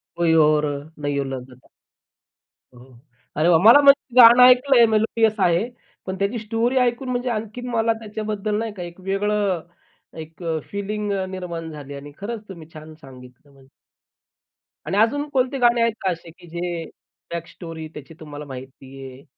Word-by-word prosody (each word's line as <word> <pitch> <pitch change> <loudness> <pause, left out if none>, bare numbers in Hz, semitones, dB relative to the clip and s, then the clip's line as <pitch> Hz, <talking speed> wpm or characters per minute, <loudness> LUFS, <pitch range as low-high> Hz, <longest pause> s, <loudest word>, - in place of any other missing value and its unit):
कोई 170 -1 +2
और 150 0 +2 0.4
नयो 140 -1 -1
लगदा! 130 -2 -9 1.1
हो, 125 - -16
हो. 125 -1 -18 0.4
अरे 155 +2 +2
वाह! 165 -2 +5
मला 235 +7 +8
म्हणजे 280 -3 +4
गाणं 240 +1 +9
ऐकलंय 250 0 +6
मेलोडियस 220 0 +1
आहे. 180 +4 +2 0.4
पण 190 - -4
त्याची 200 +4 -1
स्टोरी 225 +4 -1
ऐकून 250 +1 0
म्हणजे 250 0 -2
आणखीन 225 +2 -5
मला 230 -1 +1
त्याच्याबद्दल 215 -1 -4
नाही 225 -1 -4
का, 185 -3 -7
एक 175 +1 -10
वेगळं, 195 -1 -1 0.6
एक 160 +2 -10
अ, 165 -1 -1
फीलिंग 205 +1 -3 0.2
निर्माण 170 -3 -6
झाली 145 -2 -9
आणि 140 +1 -10
खरंच 220 +2 -6
तुम्ही 170 -5 -10
छान 155 0 -11
सांगितलं 130 +1 -15
म्हणजे. 135 -1 -21 1.2
आणि 190 +6 -1
अजून 285 +8 +2
कोणते 265 +1 0
गाणे 240 -1 +3
आहेत 230 -1 +2
का 190 -2 0
असे, 165 -1 -8
की 175 - -18
जे 170 0 -4 0.5
बॅक 170 -1 -5
स्टोरी 165 -2 -9
त्याची 150 +2 -11
तुम्हाला 150 -1 -9
माहिती 135 0 -11
आहे 130 +2 -15
190 Hz, 160 wpm, -22 LUFS, 155-230 Hz, 1.2 s, गाणं